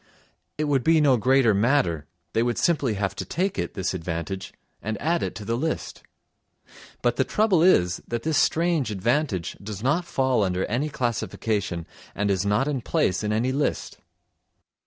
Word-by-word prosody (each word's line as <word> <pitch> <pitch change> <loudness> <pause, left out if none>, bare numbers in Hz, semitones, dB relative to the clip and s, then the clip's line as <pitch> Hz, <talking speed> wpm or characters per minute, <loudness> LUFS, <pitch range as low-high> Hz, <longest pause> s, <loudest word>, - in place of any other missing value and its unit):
It 155 - 0
would 140 -4 +1
be 160 +2 +4
no 145 -4 +5
greater 125 -1 +4
matter, 100 - +1 0.3
they 115 - +2
would 120 -1 0
simply 145 -10 +1
have 100 -1 -2
to - - -2
take 190 +3 -2
it, - - -3
this 95 -2 -1
advantage, 90 +2 -4 0.3
and 110 0 -3
add 170 +2 0
it - - -3
to 105 - -7
the 115 - 0
list. 160 +6 -3 1.0
But 120 -1 +1
the 130 - +3
trouble 205 +1 +2
is, 90 - +4
that 120 -1 -3
this 160 -1 +2
strange 165 -6 +2
advantage 110 - -1
does 105 +1 -7
not 150 +7 +1
fall 130 -7 +1
under 95 -2 0
any 130 +8 -1
classification 110 - -2 0.3
and 105 0 0
is 95 +1 0
not 105 +7 +2
in 140 -4 -1
place 100 -3 0
in 105 - -1
any 115 +4 +1
list. 140 +2 -2
120 Hz, 175 wpm, -25 LUFS, 100-145 Hz, 1.0 s, no